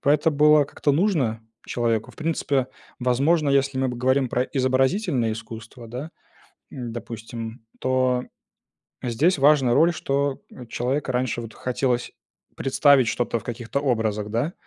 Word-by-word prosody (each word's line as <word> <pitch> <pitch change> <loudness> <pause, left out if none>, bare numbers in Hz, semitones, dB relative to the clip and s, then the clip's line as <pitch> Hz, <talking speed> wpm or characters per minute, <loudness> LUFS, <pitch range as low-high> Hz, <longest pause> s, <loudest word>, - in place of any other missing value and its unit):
поэто 150 +3 +3
была 150 0 +5
как-то 145 +1 -1
нужно 145 - +1 0.3
человеку. 115 -2 -1
В - - -21
принципе, 145 -5 0 0.3
возможно, 140 +5 +2
если 140 0 +2
мы 130 - +1
бы 125 - -4
говорим 130 +1 +2
про 125 - +1
изобразительные 130 - +1
искусства, 115 +2 -9
да, 125 +7 -6 0.6
допустим, 115 -1 -7
то 130 -1 +1 0.8
здесь 145 +9 +2
важна 135 -3 +4
роль, 170 +5 +5
что 140 -2 -1 0.3
человека 130 +4 -2
раньше 125 -1 -1
вот 115 -2 -9
хотелось 125 -1 -1 0.4
представить 135 -2 +4
что-то 120 0 -1
в - - -18
каких-то 120 +3 -3
образах, 110 -6 0
да. 120 +10 -1
130 Hz, 130 wpm, -24 LUFS, 120-140 Hz, 0.8 s, была